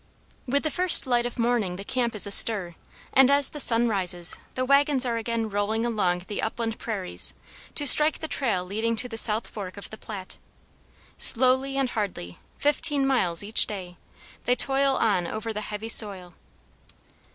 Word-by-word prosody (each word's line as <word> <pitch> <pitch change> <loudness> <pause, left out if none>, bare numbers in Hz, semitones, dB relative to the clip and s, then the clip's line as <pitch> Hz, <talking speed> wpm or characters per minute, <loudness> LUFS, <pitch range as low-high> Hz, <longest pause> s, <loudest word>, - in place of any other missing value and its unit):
With 280 +3 -1
the 310 - -3
first 365 +1 +5
light 240 -2 -1
of 245 - -11
morning 230 -6 -2
the 195 - -9
camp 240 +1 -4
is 210 - +2
astir, 200 -3 +3 0.4
and 265 0 +4
as 280 -1 +3
the 295 - -11
sun 235 -3 +3
rises, 180 -5 +1 0.2
the 255 - -3
wagons 280 -1 +1
are 235 -2 -3
again 230 0 -4
rolling 215 +2 -3
along 205 -7 -2
across - - -17
the 205 - -6
upland 225 0 -5
prairies, 200 -5 -5 0.4
to 290 - +1
strike 300 +3 +7
the 315 - -7
trail 225 -12 -2
leading 220 +5 -4
to 250 +3 -1
the 235 - -10
south 220 0 +2
fork 195 -2 -10
of 200 - -11
the 220 - -11
Platte. 195 -4 -10 0.8
Slowly 260 +2 +6
and 265 -3 -2
hardly, 180 - -7 0.2
fifteen 290 -1 -1
miles 190 -10 -1
each 215 +3 +2
day, 185 -4 -9 0.5
they 250 - 0
toil 270 +2 0
on 190 -6 -1
over 220 +3 -7
the 210 - -6
heavy 215 +1 -8
soil. 195 -6 0
225 Hz, 175 wpm, -23 LUFS, 200-260 Hz, 0.8 s, strike